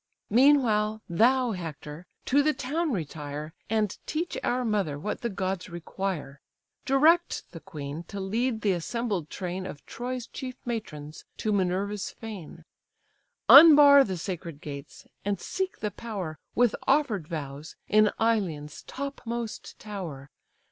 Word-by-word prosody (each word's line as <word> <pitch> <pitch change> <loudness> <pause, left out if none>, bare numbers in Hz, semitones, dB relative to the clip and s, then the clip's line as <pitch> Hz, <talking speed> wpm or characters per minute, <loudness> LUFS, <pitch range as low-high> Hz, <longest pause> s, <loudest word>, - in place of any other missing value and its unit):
Meanwhile 220 -4 +4
thou, 245 +7 +3
Hector, 165 -2 -7 0.2
to 280 +3 +4
the 305 +1 +2
town 310 +5 -1
retire, 150 - -5 0.2
And 215 -2 +1
teach 325 +3 -2
our 250 0 0
mother 200 -10 0
what 205 +8 -4
the 235 - -1
gods 190 -2 -3
require: 170 -4 -4 0.4
Direct 315 +6 +4
the 165 - -8
queen 150 -4 -6
to 200 - -7
lead 225 +4 -1
the 205 - +2
assembled 190 -1 -2
train 185 0 -4
Of 145 - -9
Troy's 250 0 -5
chief 255 0 -7
matrons 155 -11 -5
to 215 - -1
Minerva's 195 +2 0
fane; 185 -7 -9 0.8
Unbar 285 -2 +10
the 190 -7 -3
sacred 170 -3 -5
gates, 140 -1 -9 0.2
and 200 -2 -1
seek 380 - -3
the 210 - -1
power, 195 -10 -6 0.2
With 240 -2 +3
offer'd 265 - +2
vows, 150 -1 -6
in 215 0 +5
Ilion's 180 -10 0
topmost 240 -5 -5
tower. 170 -10 -7
205 Hz, 130 wpm, -27 LUFS, 165-245 Hz, 0.8 s, Unbar